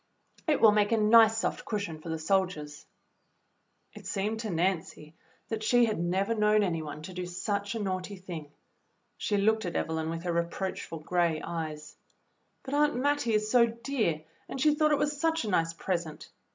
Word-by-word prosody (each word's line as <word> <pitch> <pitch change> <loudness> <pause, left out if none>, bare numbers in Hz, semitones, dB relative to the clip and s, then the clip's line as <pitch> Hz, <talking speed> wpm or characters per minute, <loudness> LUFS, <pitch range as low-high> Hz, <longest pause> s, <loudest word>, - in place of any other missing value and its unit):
"It 300 -3 +3
will 220 - +7
make 210 0 +2
a 230 - +3
nice 220 +1 +6
soft - - -1
cushion 200 -8 -4
for 165 - -8
the 160 - -2
soldiers." 160 -4 -1 1.1
It - - -10
seemed 210 +3 -2
to 225 -1 -4
Nancy 165 -3 -2 0.4
that 225 -1 -3
she 240 +2 +4
had 215 -5 -2
never 190 +5 0
known 210 -1 +3
any 165 -4 -1
one 150 0 -7
to 185 - -8
do 180 0 -4
such 200 +3 -3
a - - -2
naughty 190 -1 -3
thing. 175 -5 -8 0.7
She 205 - 0
looked 220 +2 +2
at 175 -3 -3
48 - - +2
THE - - -4
BLUE 160 - -2
AUNT 160 - -2
Evelyn - - -2
with 165 0 -4
her 175 -1 -1
reproachful 170 0 -3
gray 170 -1 +1
eyes. 155 -2 -5 0.7
"But 270 - -6
Aunt 295 -1 +3
Mattie 270 -3 +1
is 215 0 0
so 240 -2 +6
dear, 230 - -2 0.3
and 270 - -5
she 300 +2 +4
thought 305 0 +2
it 295 - +4
was 295 0 -1
such 325 -2 +1
a - - -2
nice 165 -2 +1
present." 170 -2 -4
200 Hz, 200 wpm, -29 LUFS, 170-225 Hz, 1.1 s, will